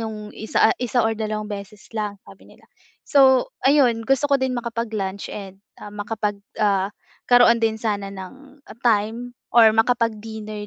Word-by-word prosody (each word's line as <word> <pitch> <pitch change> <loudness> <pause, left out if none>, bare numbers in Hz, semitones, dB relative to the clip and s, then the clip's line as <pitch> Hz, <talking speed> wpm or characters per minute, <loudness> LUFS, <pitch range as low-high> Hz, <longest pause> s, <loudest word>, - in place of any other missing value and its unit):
yung 220 -1 -4 0.2
isa 220 0 +2
isa 245 0 +1
o 225 - +2
dalawang 215 -1 -3
beses 205 0 -8
lang 210 -2 -3
sabi - - -16
nila. - - -20 0.4
So, 265 -3 +4 0.2
ayun 260 -5 +4
gusto 270 +2 +2
ko 280 - +5
din 260 -1 -1
makapag-lunch 225 -5 -4
and, 195 -2 -8 0.2
ah, 210 - -8
makapag, 210 0 -3 0.2
ah, 200 -2 +2 0.4
'karoon 245 -1 +6
din 220 -1 +1
sana 205 -3 -2
ng 265 +9 -12 0.2
time 230 +1 0 0.2
or 225 -2 +8
makapag-dinner 220 -2 -1
220 Hz, 145 wpm, -22 LUFS, 210-245 Hz, 0.4 s, or